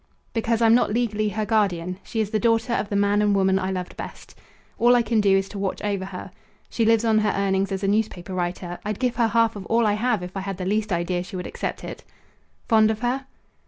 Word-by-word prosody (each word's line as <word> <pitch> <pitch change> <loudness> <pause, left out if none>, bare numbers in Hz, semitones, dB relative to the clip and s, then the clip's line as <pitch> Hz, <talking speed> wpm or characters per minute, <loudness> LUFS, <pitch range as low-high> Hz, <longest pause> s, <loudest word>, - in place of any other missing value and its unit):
"Because 230 0 0
I'm 225 0 +6
not 240 -3 +3
legally 215 -2 0
her 215 +1 -2
guardian. 185 -5 0
She 225 - -5
is 210 -1 -3
the 215 - +1
daughter 230 +1 +2
of 210 - -1
the 200 - -2
man 205 +1 +3
and 205 -1 +3
woman 190 0 +3
I 185 - -2
loved 185 -1 -4
best. - - -9 0.5
All 240 +1 +6
I 240 - +3
can 220 -1 +1
do 195 -1 +4
is 195 0 -1
to 205 - -7
watch 195 -1 -2
over 200 -2 -1
her. 190 -1 -8 0.4
She 230 - +1
lives 225 0 +3
on 220 -1 +4
her 215 -1 +1
earnings 195 0 0
as 195 +1 -3
a - - +1
newspaper 200 -3 -1
writer. 175 0 -3
I'd 210 -1 -3
give 250 -2 -1
her 235 -2 +3
half 230 0 +2
of 200 - -6
all 230 0 +2
I 210 - +3
have 215 -2 0
if 180 +2 -8
I - - -2
had 195 -1 -4
the 185 - -4
least 210 +2 0
idea 175 +1 0
she 185 - -8
would 180 - -4
accept - - -4
it." - - -8 0.6
"Fond 220 -2 +5
of 220 0 -2
her?" 255 +2 -1
210 Hz, 250 wpm, -24 LUFS, 190-225 Hz, 0.6 s, I'm